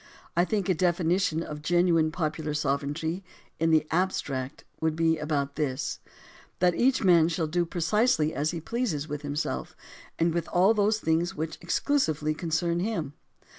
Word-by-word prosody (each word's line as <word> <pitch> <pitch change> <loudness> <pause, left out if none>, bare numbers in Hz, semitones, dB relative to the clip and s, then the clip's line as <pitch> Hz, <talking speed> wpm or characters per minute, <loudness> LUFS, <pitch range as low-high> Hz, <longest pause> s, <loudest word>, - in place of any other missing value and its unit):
I 175 +1 +4
think 200 -2 -1
a 185 - +3
definition 175 -1 +1
of 150 -2 -7
genuine 170 -1 +3
popular 155 -2 -2
sovereignty, 150 +5 -1 0.4
in 165 +1 +2
the 160 -1 +4
abstract, 145 -7 -1 0.2
would 160 -1 0
be 160 -1 +2
about 140 -2 -2
this: 145 -2 -2 0.6
That 180 0 +3
each 255 +6 +2
man 170 -4 +6
shall 165 -1 -1
do 170 +2 0
precisely 170 -1 +1
as 145 +3 0
he 170 - -3
pleases 170 - -2
with 150 -1 -5
himself, 145 0 -3 0.4
and 165 0 +2
with 170 0 -2
all 185 +5 +4
those 215 0 +2
things 170 +1 0
which 160 -1 -4
exclusively 170 - 0
concern 170 +1 -1
him. 175 -8 -2
165 Hz, 155 wpm, -27 LUFS, 155-180 Hz, 0.6 s, man